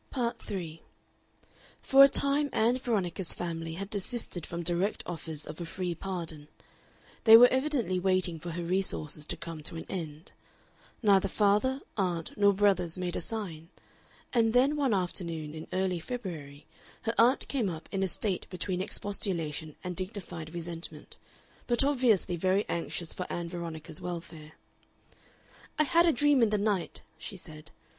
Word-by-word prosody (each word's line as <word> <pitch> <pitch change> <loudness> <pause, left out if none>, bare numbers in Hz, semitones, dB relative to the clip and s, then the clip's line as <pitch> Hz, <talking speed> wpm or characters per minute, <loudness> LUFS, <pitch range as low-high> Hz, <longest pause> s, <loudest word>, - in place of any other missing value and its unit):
Part 240 -3 -2
3 165 -5 -6 1.0
For 270 +1 +7
a 275 - +8
time 280 +1 +2
Ann 235 +3 +2
Veronica's 195 -7 -1
family 165 -2 -4
had 195 +3 -5
desisted 205 -4 -2
from 170 0 -4
direct 175 +4 0
offers 160 -3 -4
of 155 +3 -8
a - - -3
free 180 0 -3
pardon; 165 -4 -5 0.8
they 225 0 +11
were 245 +2 +9
evidently 260 - 0
waiting 185 -3 +1
for 175 - -6
her 170 +1 -4
resources 170 -4 0
to - - -1
come 165 -2 -7
to 155 - -3
an 165 - -6
end. 160 -3 -6 0.7
Neither 195 -2 +5
father, 210 +7 +2 0.2
aunt, 175 -5 -1
nor 205 -1 +5
brothers 190 -4 +2
made 180 -1 -2
a - - -1
sign, 170 -6 -4 0.6
and 225 -2 +3
then 265 +4 +4
one 275 -7 +2
afternoon 170 -4 -3
in 160 0 -8
early 185 -2 0
February 160 - -7 0.4
her 225 - 0
aunt 245 +4 +4
came 245 -8 0
up 160 -2 -7
in 195 - -1
a 190 - +2
state 190 +1 +1
between 180 0 -3
expostulation 170 -7 -1
and 180 -1 -4
dignified 185 -4 -6
resentment, 170 0 -7 0.5
but 240 +1 +4
obviously 245 -10 +3
very 185 +4 +1
anxious 170 0 -3
for 180 - -5
Ann 170 -1 -3
Veronica's 165 -1 -4
welfare. 165 -3 -7 1.2
"I 305 - +5
had 335 +5 +4
a - - +6
dream 290 0 +3
in 230 - +5
the 210 - +1
night," 200 -3 -1 0.2
she 195 - -6
said. 155 -3 -9
185 Hz, 155 wpm, -30 LUFS, 165-220 Hz, 1.2 s, they